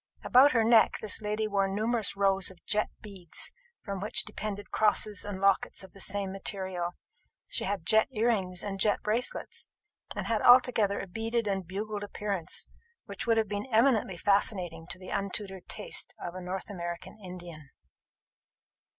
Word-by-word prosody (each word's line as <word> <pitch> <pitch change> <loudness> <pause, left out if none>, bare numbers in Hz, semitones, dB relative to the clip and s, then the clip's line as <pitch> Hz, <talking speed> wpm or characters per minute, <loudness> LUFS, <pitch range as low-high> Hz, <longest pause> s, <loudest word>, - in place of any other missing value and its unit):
About 265 +3 +6
her 230 -2 +4
neck 225 0 +5
this 215 +1 0
lady 215 +1 -1
wore 200 -2 +1
numerous 215 +2 0
rows 195 -1 +3
of 185 -3 -16
jet 210 0 0
beads, 190 -6 -2 0.3
from 200 -2 -4
which 210 - +1
depended 205 -1 -6
crosses 210 -1 +2
and 205 -2 -5
lockets 195 0 +2
of 190 - -13
the 195 - -9
same 200 0 0
material: 190 -3 -3 0.6
she - - +1
had 195 -4 -2
jet 220 +4 +5
earrings 210 -7 +1
and 195 -1 -4
jet 205 +1 +2
bracelets; 225 +4 -1 0.5
and - - -3
had 225 -2 0
altogether 245 -5 +5
a - - -4
beaded 225 +4 -2
and 195 -3 -2
bugled 205 +2 -4
appearance, 200 -3 -2 0.4
which 250 - -6
would 230 -1 +4
have 220 -1 +2
been 205 +3 -4
eminently 225 -6 +3
fascinating 180 -4 +1
to 175 - -4
the 185 0 -10
untutored 195 -1 -4
taste - - -2
of 175 - -5
a 185 - -7
North 185 +3 -5
American 175 +1 -6
Indian. 175 -5 -9
200 Hz, 160 wpm, -29 LUFS, 190-215 Hz, 0.6 s, About